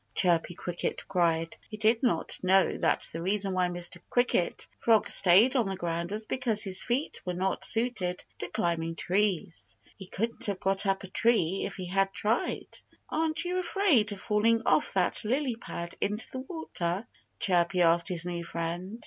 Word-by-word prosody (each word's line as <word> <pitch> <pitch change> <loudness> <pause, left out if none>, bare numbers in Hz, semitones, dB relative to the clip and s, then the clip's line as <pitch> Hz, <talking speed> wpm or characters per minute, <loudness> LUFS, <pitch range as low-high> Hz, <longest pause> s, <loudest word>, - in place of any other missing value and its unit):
Chirpy 175 -1 +3
Cricket 175 -1 -4
cried. 165 -3 0
He 215 - -7
did 225 +2 +2
not 235 -11 +1
know 190 +1 +3
that - - +1
the 165 - -5
reason 195 +1 0
why 185 -1 +1
Mr. 175 0 -3
Cricket 245 -8 0
Frog 225 -2 +3
stayed 200 +9 +5
on 240 -6 +2
the 195 - -2
ground 170 -1 -3
was 215 +2 -4
because 225 -3 0
his 190 -2 +3
feet 255 +5 -2
were 180 -1 -4
not 190 +2 -2
suited 225 -6 +2
to - - -3
climbing 165 -1 -2
trees. 175 - -1 0.2
He 190 - -11
couldn't 230 +5 -1
have 200 -2 -2
got 195 +1 +2
up 195 0 0
a - - -7
tree 195 -3 +1
if - - -8
he 185 - -6
had 195 +2 +1
tried. 220 +4 -2 0.3
"Aren't 320 +1 0
you 360 +1 -1
afraid 340 - +2
of 200 - -6
falling 225 +3 +1
off - - +3
that - - +1
lily 255 +2 -1
pad 170 -6 -7
into 210 +3 0
the 260 - -5
water?" 235 - -3 0.3
Chirpy 175 -1 +2
asked 170 0 +3
his 175 -2 -1
new 175 -1 -4
friend. 170 +6 -5
195 Hz, 175 wpm, -28 LUFS, 175-225 Hz, 0.3 s, stayed